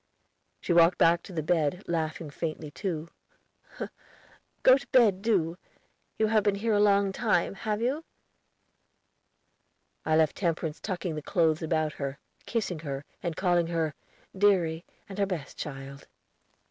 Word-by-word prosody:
She 175 - 0
walked 170 +1 +6
back 170 -1 +4
to - - -12
the 160 -3 -3
bed, 165 +3 +1
laughing 160 -2 -2
faintly, 155 -1 -4
too. 170 -3 -4 1.5
"Go 255 - +8
to 275 +1 -5
bed, 215 -7 +4
do. 180 -6 +1 0.6
You 220 - +3
have 215 0 +3
been 205 -1 +1
here 220 +2 0
a 205 - +3
long 200 -1 +4
time, 215 +1 +1
have 215 +2 -2
you?" 275 +6 0 2.0
I 155 - +2
left 155 -2 +3
Temperance 165 -3 -2
tucking 180 -3 -3
the 155 - -4
clothes 160 -1 +1
about 155 -1 0
her, 140 0 -3 0.3
kissing 205 -8 -2
her, 140 -2 -5 0.2
and 170 -2 -3
calling 175 -2 +2
her 165 -3 -1 0.4
"deary 180 -5 +2 0.2
and 200 0 -8
her 200 - +2
best 165 -8 -5
child." 140 -1 -7
170 Hz, 145 wpm, -28 LUFS, 155-200 Hz, 2.0 s, Go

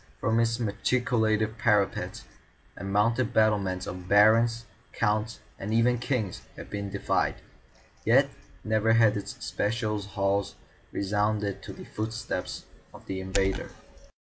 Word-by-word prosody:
From 115 +1 +1
its 115 0 +2
machicolated 110 -1 0
parapets 100 -10 +1 0.5
and 95 +1 -6
mounted 115 +4 +2
battlements 100 -4 +2
Barons, 110 +6 +3 0.3
Counts, 110 -1 0 0.2
and 100 - -4
even 115 +2 +3
Kings 120 -6 -2
had - - -10
been 100 -1 -3
defied, 100 0 0 0.7
yet - - +5 0.4
never 110 +1 +2
had 115 -2 +5
its 100 - -5
spacious 105 -2 -1
halls 100 0 0 0.4
resounded 105 0 -1
to - - -8
the - - -10
footstep 110 +2 -4 0.4
of - - -14
the 95 -1 -4
invader. 95 0 0
105 Hz, 120 wpm, -28 LUFS, 100-115 Hz, 0.7 s, yet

